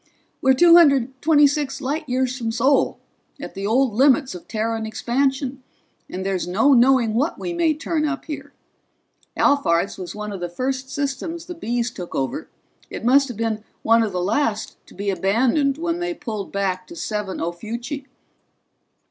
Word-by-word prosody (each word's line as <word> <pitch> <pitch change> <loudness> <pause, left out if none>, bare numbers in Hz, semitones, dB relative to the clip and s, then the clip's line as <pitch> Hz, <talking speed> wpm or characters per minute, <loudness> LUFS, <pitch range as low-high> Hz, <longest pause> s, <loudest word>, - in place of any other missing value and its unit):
"We're 265 -1 +4
two 340 +4 +7
hundred 270 -5 +4
twenty 295 -2 +5
six 285 -1 0
light 290 +2 -3
years 255 0 0
from 230 -4 -3
Sol, 260 +5 +2 0.4
at - - -7
the 195 0 -4
old 250 +1 +2
limits 270 +3 +3
of 180 - -10
Terran 220 0 -2
expansion, 265 +3 -1 0.5
and 190 +1 -5
there's 190 -3 -1
no 225 +11 +3
knowing 245 -2 +4
what 275 +8 0
we 350 - -4
may 335 -3 +2
turn 315 0 -2
up 300 -2 -2
here. 290 -2 -7 0.9
Alphard's 195 -12 +2
was 180 -2 -6
one 210 0 -5
of 195 - -6
the 175 0 -4
first 260 +7 -3
systems 290 +5 -3
the 355 - -6
Bees 240 -7 -2
took 180 -7 -8
over. 135 -2 -3 0.4
It - - -6
must 275 +3 +5
have 245 -5 -7
been 220 -1 -2 0.2
one 230 +1 +5
of 220 -2 0
the 180 -1 -2
last 215 +1 -1
to - - -16
be 200 +1 -1
abandoned 240 - +1
when 335 +1 -2
they 350 0 -2
pulled 220 -9 -5
back 185 -2 -2
to - - -11
70 210 +1 -3
Ophiuchi." 235 - -5
250 Hz, 175 wpm, -22 LUFS, 210-285 Hz, 0.9 s, two